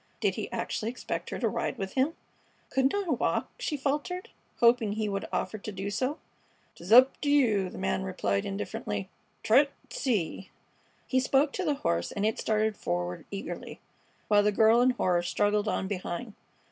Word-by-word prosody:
Did - - +1
he - - -5
actually 220 - -2
expect 250 - -4
her - - -4
to - - 0
ride - - -2
with 195 -1 -4
him? 275 +5 +1 0.6
"Couldn't 265 +4 +2
I 405 -2 -1
walk?" - - 0
she 310 -12 -2
faltered, 295 +7 -2 0.3
hoping 235 -3 +4
he 215 0 -1
would 195 -1 -2
offer 215 - -2
to 215 - -6
do 195 +1 -4
so. 255 +9 -1 0.6
"'T's 175 +4 -10
up 255 +3 +7
t' 290 - 0
you," 220 -10 +3
the - - -10
man 65 0 -1
replied, 100 +9 -1
indifferently. 100 0 -4 0.3
"Try 255 +7 +6
't - - -17
an' - - -33
see!" 195 - -1 0.6
He 260 - +2
spoke 275 +2 +2
to 380 - -2
the 300 -4 +1
horse, 85 0 +1
and 205 - -1
it 220 - 0
started 215 0 +1
forward 90 0 -3
eagerly, 200 -1 -6 0.5
while 205 -1 +5
the 210 0 +3
girl 220 +3 +5
in 250 - +5
horror 180 -8 +1
struggled 205 +4 +1
on 190 - -1
behind. 200 +3 -4
215 Hz, 185 wpm, -29 LUFS, 190-260 Hz, 0.6 s, up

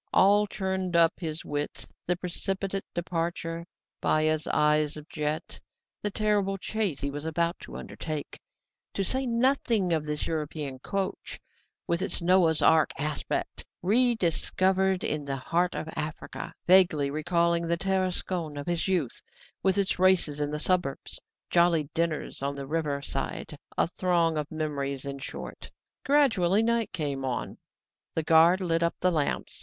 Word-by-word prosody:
All 205 +2 +5
churned 190 -3 -2
up 170 0 +4
his 160 -2 -4
wits 145 0 -3 0.2
the 180 - +2
precipitate 195 +2 -3
departure, 170 -1 -3 0.3
Baya's 155 0 +2
eyes 150 0 +2
of 150 0 -10
jet, 150 0 -3 0.4
the 210 - -1
terrible 205 -2 +1
chase 200 -6 -2
he 140 0 -2
was 145 +1 -6
about 170 +2 -1
to - - -10
undertake, 155 -2 -6 0.6
to 195 - 0
say 260 +6 0
nothing 235 -6 +2
of 160 -2 +1
this 150 0 -2
European 150 -4 -3
coach; 195 +7 -4 0.5
with 170 +1 0
its - - 0
Noah's 170 -3 +3
Ark 160 -1 +5
aspect, 150 +1 -3 0.2
rediscovered 190 -3 +2
in 150 -1 -1
the 140 -1 -2
heart 170 +7 0
of - - -4
Africa, 150 +1 -5
vaguely 175 -6 +5
recalling 170 +2 +1
the 170 0 +1
Tarascon 185 -4 -1
of 145 - -5
his 175 0 0
youth, 175 -10 -1 0.4
with 190 +1 +2
its 195 -2 +1
races 180 -6 +3
in 145 - 0
the 150 - -2
suburbs, 175 -3 +1 0.3
jolly 170 -4 +3
dinners 165 -4 -2
on 140 +1 -2
the 140 -1 -5
river 145 -1 -2
side 135 +2 -4 0.2
a - - +4
throng 170 -2 +1
of 150 -1 -2
memories, 140 -3 -3
in 140 0 -5
short. - - -7 0.3
Gradually 225 -9 +3
night 230 -1 +1
came 140 -4 -3
on. 130 -2 -3 0.6
The 160 - 0
guard 165 +4 +5
lit 165 -2 +1
up 170 0 +1
the 185 - +2
lamps. 155 -4 -1
170 Hz, 150 wpm, -28 LUFS, 150-190 Hz, 0.6 s, All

